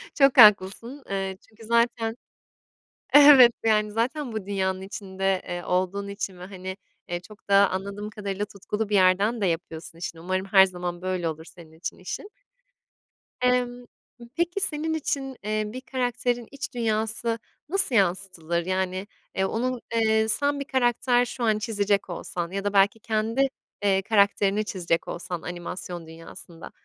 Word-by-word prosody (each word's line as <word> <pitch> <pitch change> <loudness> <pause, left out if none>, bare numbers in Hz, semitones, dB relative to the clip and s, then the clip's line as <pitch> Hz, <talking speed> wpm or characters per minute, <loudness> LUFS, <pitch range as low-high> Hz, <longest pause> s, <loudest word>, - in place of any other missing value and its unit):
Çok 275 -2 +4
haklısın, 220 +5 +5
eee, 195 -1 -2
çünkü 225 0 -15
zaten, 235 0 +1 1.0
evet, 285 -4 +9
yani 215 -1 +2
zaten 250 +5 -1
bu 220 -3 -4
dünyanın 190 -1 -1
içinde, 195 -1 -2
eee, 175 -1 -4
olduğun 185 +3 -1
için 200 -2 -5
ve 180 - -8
hani, 190 0 -7 0.3
eee, 175 0 -2
çok 205 +3 -17
da 200 -1 +6
anladığım 200 +2 -4
kadarıyla 205 -1 -4
tutkulu 210 +1 -4
bir 210 - +1
yerden 200 +5 +3
de - - +2
yapıyorsun 165 -1 -4
işini. 165 -1 -6
Umarım 185 +2 -2
her 195 -1 +7
zaman 180 -1 -5
böyle 185 -2 -2
olur 160 0 -7
senin 165 -2 -14
için, 160 +3 -6
işin. 185 - -6 1.1
Imm. 245 -1 +1 0.5
Peki 345 +4 0
senin 320 -1 0
için, 270 -4 -3
eee, 215 +1 -1
bir 250 +5 -7
karakterin 245 -2 -2
iç 280 0 -6
dünyası 225 0 -1 0.3
nasıl 380 -8 +2
yansıtılır? 175 -3 0
Yani, 185 +1 -2 0.3
eee, 190 - +1
onun, 245 +4 -2
eee, 220 -1 +3
sen 285 +5 +1
bir 280 - -4
karakter 245 -1 +2
şu 245 0 -6
an 220 -2 +3
çizecek 205 -2 0
olsan 175 0 -4
ya 195 +1 -3
da 205 0 -1
belki 200 +2 +4
kendi, 225 +4 0 0.4
eee, 195 -1 +3
karakterini 200 0 +2
çizecek 170 -4 -1
olsan, 175 -1 -5
animasyon 175 -1 -6
dünyasında, 165 +1 -10
205 Hz, 150 wpm, -25 LUFS, 185-235 Hz, 1.1 s, evet